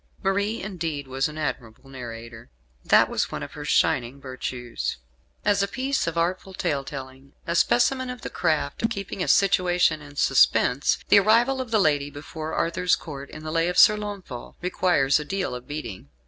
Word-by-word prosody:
Marie, 200 +3 0
indeed, 165 -8 -4
was 135 +1 0
an 155 0 -9
admirable 125 -4 -5
narrator. 115 - -9 0.3
That - - +5
was - - -2
one - - -4
of - - -8
her - - -8
shining 125 +2 +1
virtues. 125 - -5 0.5
As 205 -1 +3
a 200 - +1
piece 265 +1 -1
of 165 0 -2
artful 185 +3 -1
tale 140 -5 -1
telling, 135 0 -9
a 170 -1 -2
specimen 255 +6 +2
of 250 -1 -7
the - - -5
craft 155 -4 -1
of 225 - +1
keeping 200 -3 -5
a - - -1
situation 180 -5 +3
in 145 0 -13
suspense, 135 -1 +3
the - - +8
arrival 235 +6 +3
of 255 - -6
the 220 -1 +2
lady 145 -5 +2
before 155 +2 -7
Arthur's 170 +2 +1
Court, 140 -3 -9
in 155 - -10
"The 155 - -5
Lay 165 +1 +1
of 180 - -2
Sir 210 0 +8
Launfal," 200 -12 -7
requires 175 -6 +2
a - - -4
deal 190 +2 -3
of 125 0 -8
beating. 110 - -7
155 Hz, 185 wpm, -25 LUFS, 135-195 Hz, 0.5 s, the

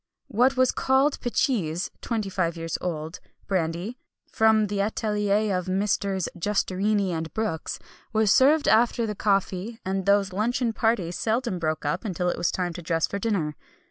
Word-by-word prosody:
What 255 +3 +3
was 255 -1 +4
called 265 +2 +2
picheese 200 - 0
(twenty 220 -4 -2
five 170 -3 -1
years 165 -1 -4
old) 160 -2 -4 0.3
brandy, 185 +5 -2 0.3
from 220 -1 +4
the 200 -1 -1
atelier 210 -1 0
of 180 0 -3
Messrs. 195 -1 0
Justerini 200 +1 0
and 160 -1 -3
Brooks, 215 -8 -2 0.3
was 220 -3 +3
served 290 +7 +5
after 235 +1 +3
the 210 - -2
coffee; 195 +2 -1
and 190 0 -2
those 200 -2 +3
luncheon 230 +3 0
parties 215 -7 0
seldom 225 -4 0
broke 155 -2 -2
up 150 +5 -1
until 180 -4 -1
it - - -2
was 175 - +1
time 180 -2 -2
to 175 - -7
dress 165 -1 +1
for 200 - -4
dinner. 190 -9 -1
200 Hz, 160 wpm, -25 LUFS, 180-220 Hz, 0.3 s, served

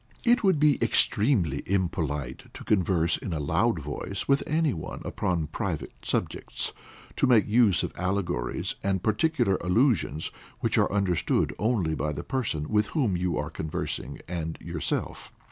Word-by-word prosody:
It 240 0 +4
would 190 -6 +4
be 150 -2 +4
extremely 100 - +2
impolite 80 -8 -2
to - - -8
converse 90 -4 +2
in 95 - -5
a 80 - -2
loud 70 - +1
voice 100 +2 -4
with 140 0 +4
any 155 -2 +2
one 80 - -6
upon 85 -4 -1
private 75 - -3
subjects, - - -2 0.4
to - - +3
make 115 -5 +5
use 110 -4 +4
of - - -3
allegories 90 -8 -1
and 95 -2 0
particular 110 - +2
allusions 90 - +1 0.3
which - - 0
are - - +2
understood 95 -4 +1
only 105 -8 +1
by 75 -1 -1
the 70 - -5
person 105 - -1
with 105 -1 +2
whom 125 - 0
you 90 0 0
are 75 +2 -3
conversing 75 -3 -4
and 80 -2 -4
yourself. 85 -2 -3
95 Hz, 150 wpm, -27 LUFS, 80-115 Hz, 0.4 s, make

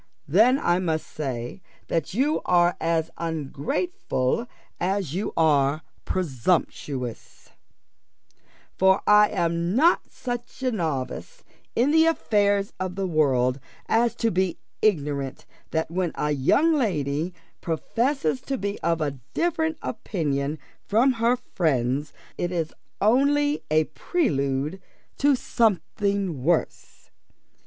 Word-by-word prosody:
Then 220 - +5
I 175 -9 +2
must 160 -4 -1
say 130 +1 -5 0.3
that 165 -3 -1
you 285 +6 +1
are 175 0 +3
as 165 -1 0
ungrateful 160 - -2 0.3
as 185 -4 -1
you 195 +4 -2
are 150 -2 +3 0.2
presumptuous; 135 -5 -2 1.3
for 190 +1 +4
I 210 0 +6
am 170 +2 0
not 325 +7 +3
such 245 +1 -6
a 255 - +2
novice 170 - -3 0.3
in 255 +5 +3
the 320 +1 +5
affairs 205 -9 +1
of 185 -1 -3
the 195 0 -1
world 135 -6 +2 0.3
as 230 0 +2
to 230 -1 0
be 185 -1 0 0.2
ignorant 145 -9 0 0.2
that 160 0 -1
when 180 -1 -1
a 150 - -1
young 215 - +3
lady 165 - 0 0.3
professes 255 - -1
to 270 0 -3
be 200 -1 -3
of 165 0 0
a 140 -3 -2 0.2
different 320 -2 0
opinion 150 - -2 0.3
from 235 +6 +3
her 235 0 +2
friends, 145 - -1 0.3
it 175 - -1
is 165 -3 -2 0.3
only 285 +6 +3
a 155 +1 +4
prelude 150 - -1 0.4
to 285 0 +4
something 200 - 0
worse. 170 +2 -1
180 Hz, 115 wpm, -25 LUFS, 150-235 Hz, 1.3 s, I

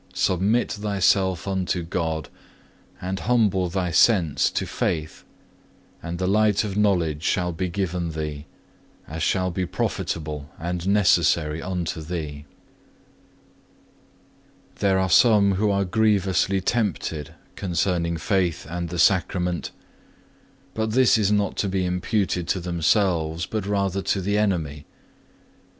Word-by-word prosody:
Submit 100 +6 +1
thyself 95 -3 +1
unto 95 -2 -1
God, 80 -2 -3 0.7
and 95 +1 -4
humble 105 -6 +2
thy 90 -1 -2
sense 85 -3 +3
to - - -2
faith, 80 -1 -3 0.8
and 85 +1 -5
the 95 - -1
light 105 +1 +3
of 100 -3 -4
knowledge 90 -8 +1
shall 90 +1 0
be 90 +2 -3
given 85 -2 -2
thee, 75 -2 -5 0.6
as 80 +2 -6
shall 90 +3 +1
be 95 +2 -2
profitable 75 -4 -3
and 85 +2 -4
necessary 85 -6 +3
unto 90 -3 -3
thee. 75 -3 -5 2.3
3. - - -27
There 95 -2 +2
are 95 0 +1
some 100 +2 +5
who 105 +3 +1
are 100 -1 +1
grievously 100 -1 +1
tempted 90 - -2 0.2
concerning 85 -2 -1
faith 90 -2 0
and 85 0 -4
the 90 - -5
Sacrament; 90 -2 +1 1.0
but 110 0 -2
this 130 -4 +5
is 105 -2 +2
not 105 -2 +1
to 100 - 0
be 95 -1 0
imputed 90 -1 -1
to 95 - 0
themselves 85 -1 0
but 105 0 -4
rather 100 -1 0
to 95 - 0
the 100 +3 0
enemy. 80 -8 -1
90 Hz, 125 wpm, -24 LUFS, 85-100 Hz, 2.3 s, some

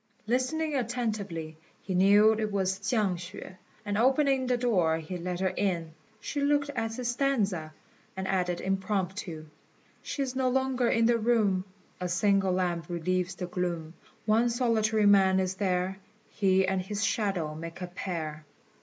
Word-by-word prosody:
Listening 260 +7 0
attentively, 210 - -3 0.2
he 190 - -5
knew 200 +4 +6
it 215 -1 -2
was 190 -1 0
Chiang 200 -3 0
hsüeh; 185 +1 -9 0.3
and 205 0 -1
opening 265 +1 +3
the 250 -1 +2
door 185 -10 +2
he 165 +3 -6
let 180 0 -4
her 190 - +2
in. 170 -5 -1 0.3
She 285 - -3
looked 285 0 +2
at 225 -4 -3
his 250 0 -3
stanza, 210 - 0 0.5
and 190 0 -3
added 180 -2 0
impromptu 190 -3 -2 0.6
"She 280 - -3
is 260 -1 -4
no 260 -1 +2
longer 260 -1 +1
in 230 0 +3
the 235 0 +3
room; 215 -5 +2 0.3
A 180 0 -3
single 195 +1 +2
lamp 175 -3 -1
relieves 180 +2 -1
the 180 - -4
gloom; 175 -3 -3 0.3
One 225 +3 +3
solitary 225 -3 +2
man 190 -2 +5
is 185 0 0
there; 190 -1 -1 0.3
He 190 -1 +3
and 190 0 0
his 205 +3 -3
shadow 190 -8 0
make 165 +3 -8
a 180 - -3
pair." 165 -4 -5
195 Hz, 155 wpm, -29 LUFS, 180-230 Hz, 0.6 s, knew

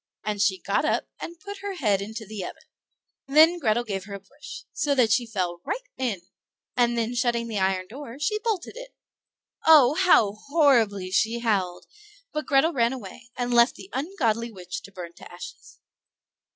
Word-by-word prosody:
and 210 -1 -2
she 195 -2 +3
got 200 +8 0
up 305 - +1 0.2
and 340 0 -8
put 405 0 -8
her 400 0 -5
head 210 - +1
into 220 +2 -6
the 210 -2 -6
oven. - - -8 0.6
Then 315 +5 +6
Grethel 240 -4 +1
gave 195 -4 -4
her 200 -1 -7
a - - -7
push, 290 +8 -11
so 285 -1 0
that 240 -5 +3
she 240 +1 +2
fell 180 -6 -3
right - - -4
in, 225 -9 -2 0.5
and 240 -1 +2
then 230 +1 -1
shutting 235 -1 0
the 215 -3 -2
iron 190 -1 +1
door, 260 +3 -9
she 420 +9 0
bolted 425 -4 -2
it. - - -10 0.7
Oh! 295 -5 +8
how 310 - +4 0.2
horribly 230 - +3
she 225 +5 +2
howled; 195 -7 -1 0.5
but 305 0 -3
Grethel 295 +4 +3
ran 235 -2 +2
away, 240 0 -10
and 245 0 -1
left 235 +1 +5
the 380 - -12
ungodly 255 - -1
witch 180 -3 -7
to 200 - -13
burn 175 -3 -8
to - - -12
ashes. 175 +1 -11
235 Hz, 180 wpm, -25 LUFS, 200-295 Hz, 0.7 s, Oh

